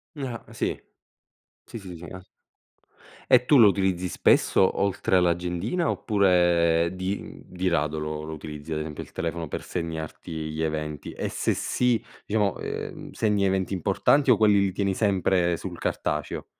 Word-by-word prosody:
Ah, 130 -5 -5
sì, - - -2 0.9
sì, - - -8
sì, 95 -4 -9
sì, 85 - -10
a 95 - -8 1.1
E 125 0 +6
tu 145 - +5
lo 115 -4 +8
utilizzi 95 -2 0
spesso 95 - +3
oltre 100 -1 +1
all'agendina, 90 - +1
oppure 85 -5 +3
di 95 +2 -5
di 95 0 -3
rado 75 -2 0
lo 75 0 -4
lo 80 - -6
utilizzi 75 0 -7
ad 75 - -1
esempio, 75 -1 -5
il - - -16
telefono 85 0 -3
per - - -4
segnarti 80 0 -5 0.2
gli 80 +1 -4
eventi? 75 -2 -3
E - - -3
se - - 0
sì 125 -2 0 0.2
diciamo, 105 -2 0
ehm, - - -6
segni 105 -3 +1
eventi 95 0 0
importanti 135 - +2
o 115 - +6
quelli 105 -2 +5
li 100 -1 +1
tieni 100 -1 0
sempre 95 -4 +2
sul 90 -1 -7
cartaceo? 75 -2 -2
90 Hz, 155 wpm, -26 LUFS, 80-100 Hz, 1.1 s, lo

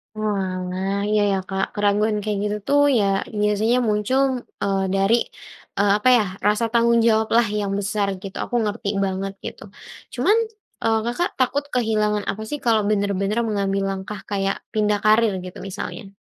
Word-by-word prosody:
Oalah, 190 -2 -2
iya 210 0 +3
iya 195 - +1
Kak, 190 0 0
keraguan 210 +1 +2
kayak 210 -2 -1
gitu 210 0 -1
tuh 285 0 +4 0.2
ya - - +2 0.4
biasanya 210 +3 +2
muncul, 210 +6 +1 0.4
eee, 195 -1 +1
dari, 195 +4 +3 0.6
eee, 200 0 +3
apa 235 +4 +3
ya, 215 - +2 0.2
rasa 210 +2 +2
tanggung 235 0 +4
jawab 220 -1 +3
lah 235 0 +4
yang 200 -1 -2
besar, 205 0 -1 0.2
gitu. 195 - -7
Aku 245 - -5
ngerti 210 -1 -2 0.2
banget 195 +1 -3
gitu - - -7 0.5
cuman, 425 +3 +3 0.5
eee, 225 -1 +2
Kakak 295 +9 0
takut 260 +3 +1
kehilangan 215 -3 +1
apa 210 - -7
sih 295 - -3
kalau 225 -2 +4
bener-bener 200 +1 0
mengambil 195 -1 0
langkah 195 +1 -6
kayak 195 -1 0 0.2
pindah 210 -1 +1
karier 215 0 +4
gitu 180 - -9
misalnya? 195 +2 -6
210 Hz, 160 wpm, -22 LUFS, 195-220 Hz, 0.6 s, tuh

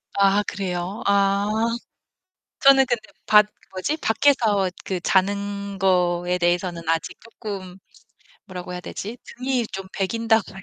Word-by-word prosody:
아 200 +1 +4
그래요? 185 +1 -4
아. 200 0 +3 1.1
저는 270 -1 +7
근데 240 -2 0 0.3
밖 210 -1 +7 0.3
그 - - -21
뭐지? 305 +11 -1
밖에서 220 -6 +2 0.2
그 185 -2 -2
자는 200 +1 0
거에 180 -1 +2
대해서는 175 -1 0
아직 165 0 -1
쪼끔 195 -5 -8 0.7
뭐라고 180 -2 -7
해야 180 - -5
되지 220 +6 -7
등이 250 -1 -2
좀 195 -2 -7
배긴다고 225 +2 +1
할 190 - -10
200 Hz, 250 characters per minute, -23 LUFS, 180-220 Hz, 1.1 s, 저는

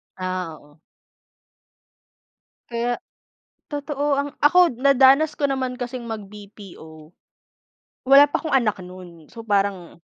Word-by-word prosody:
Ah, 185 -4 -5
oo. 145 +2 -24 1.9
Kaya 240 +1 -1 0.8
totoo 290 0 -2
ang 280 +1 -2
ako 355 +4 +4
nadanas 275 +3 +4
ko 285 -1 -1
naman 260 -2 -2
kasing 245 0 -6
mag 225 -2 -6
BPO. 190 -7 -14 1.0
Wala 275 +1 +8
pa 290 - -2
akong 315 - -1
anak 220 -7 +1
nun. 180 -3 -13
So, 230 -1 -10
parang 195 -5 -2
235 Hz, 115 wpm, -22 LUFS, 185-275 Hz, 1.9 s, Wala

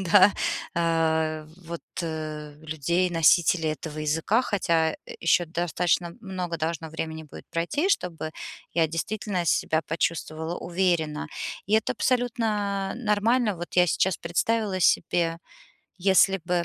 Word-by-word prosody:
да, 190 +3 +7 0.4
а, 160 -2 +1
вот, 170 -2 -8 0.2
э, 155 -2 -5
людей, 160 +4 0
носителей 165 -1 +4
этого 155 0 -7
языка, 160 +10 +1
хотя, 165 -7 +1
э, - - -8 0.2
ещё 170 +1 +3
достаточно 170 +1 0
много 185 -5 -4
должно 160 +1 -2
времени 160 0 -4
будет 150 - -12
пройти, 175 - 0
чтобы 170 - -1 0.4
я 165 -1 +4
действительно 185 +3 -2
себя 160 0 +1
почувствовала 165 0 -2
уверенно. 170 -4 0 0.4
И 200 - -4
это 220 - +2
абсолютно 215 -6 0
нормально. 220 -1 +2
Вот 175 +1 -7
я 180 0 +6
сейчас 190 +2 +2
представила 205 +3 0
себе, 165 -1 +2 0.7
если 195 0 +5
бы 175 -1 0
170 Hz, 125 wpm, -26 LUFS, 160-195 Hz, 0.7 s, да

